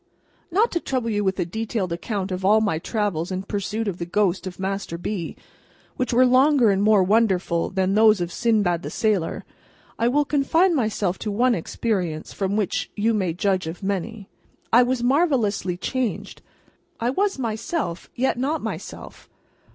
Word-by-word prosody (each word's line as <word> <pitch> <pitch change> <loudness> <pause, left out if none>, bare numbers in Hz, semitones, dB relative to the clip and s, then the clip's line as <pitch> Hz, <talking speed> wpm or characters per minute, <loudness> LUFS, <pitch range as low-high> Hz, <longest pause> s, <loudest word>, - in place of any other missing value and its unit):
Not 415 +7 +2
to 340 - 0
trouble 255 -7 -2
you 205 -1 0
with 190 -1 0
a - - +1
detailed 210 -1 -3
account 195 +2 -3
of 185 +1 -3
all 210 +3 +5
my 200 -8 0
travels 195 -4 -2
in 185 0 -3
pursuit 210 +2 -3
of 185 -3 -3
the 170 - -3
ghost 190 0 0
of 180 - -7
Master 195 -3 -3
B., 175 -1 -4 0.6
which 255 -2 -1
were 250 +2 +5
longer 255 -2 +5
and 195 0 +1
more 210 -2 +5
wonderful 185 -4 +1
than 190 0 0
those 215 -1 +5
of 175 0 -3
Sinbad 205 -8 +1
the - - -5
Sailor, 210 -7 -1 0.5
I 230 - +2
will 290 +4 +2
confine 320 +6 +2
myself 210 - -1
to 215 - -3
one 240 +4 +3
experience 175 -4 -2
from 195 0 -1
which 210 -4 -1
you 220 +2 +1
may 190 -6 0
judge 185 0 0
of 170 +4 -7
many. 200 +2 -3 0.5
I 240 - +8
was 245 0 0
marvellously 245 - +1
changed. 255 +4 -3 0.6
I 235 +2 0
was 395 +5 0
myself, 225 - -3
yet 255 0 0
not 290 +5 -1
myself. - - -7
210 Hz, 170 wpm, -23 LUFS, 185-245 Hz, 0.6 s, I